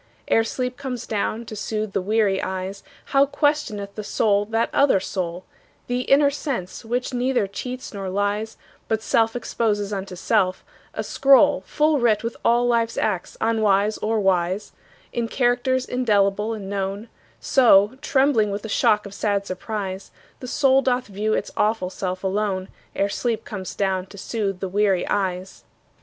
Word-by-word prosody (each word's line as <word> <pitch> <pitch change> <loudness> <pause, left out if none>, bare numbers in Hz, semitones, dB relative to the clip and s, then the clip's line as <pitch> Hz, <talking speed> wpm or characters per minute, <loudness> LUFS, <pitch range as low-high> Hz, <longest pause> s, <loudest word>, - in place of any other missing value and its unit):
Ere 225 - +4
sleep 250 +2 -3
comes 260 -4 -5
down 220 +2 -2
to 220 - -8
soothe 215 -1 -3
the - - 0
weary 205 -1 +1
eyes, 190 +1 -4 0.3
How 275 +1 +5
questioneth 275 -10 -1
the 215 - -6
soul 205 0 +1
that 225 +2 0
other 280 -8 +4
soul, 180 -1 -4 0.4
The 245 0 -1
inner 280 +2 +4
sense 265 - -4
which 245 +3 -2
neither 250 -2 +1
cheats 250 +6 -6
nor 195 -2 -4
lies, 205 +3 -1 0.3
But 220 0 -1
self 225 0 +2
exposes 210 -3 -1
unto 190 -2 -5
self, 185 -1 0 0.3
a - - -2
scroll 270 -8 +4
Full 300 -1 +2
writ 225 -3 +2
with 230 0 -3
all 240 +1 +3
life's 230 -1 +1
acts 180 - -2
unwise 215 -2 +2
or 220 +1 0
wise, 190 0 0 0.4
In 235 -1 -1
characters 250 +1 +1
indelible 210 -3 +1
and 200 -3 -7
known; 200 +2 -3 0.3
So, 235 -2 +4
trembling 265 -8 +2
with 200 +1 -4
the 220 - -6
shock 210 +1 +2
of 200 - -9
sad 200 -1 -1
surprise, 195 0 -5 0.3
The 255 - -7
soul 270 +1 +3
doth 255 -1 0
view 210 +2 -1
its - - -3
awful 210 -4 0
self 185 -1 -4
alone, 190 -1 -1 0.3
Ere 200 - +1
sleep 225 +2 -2
comes 190 -5 -6
down 190 -2 -1
to 200 - -13
soothe 200 -2 -3
the 190 - -1
weary 195 -1 +1
eyes. 190 -1 -2
215 Hz, 160 wpm, -23 LUFS, 195-240 Hz, 0.4 s, How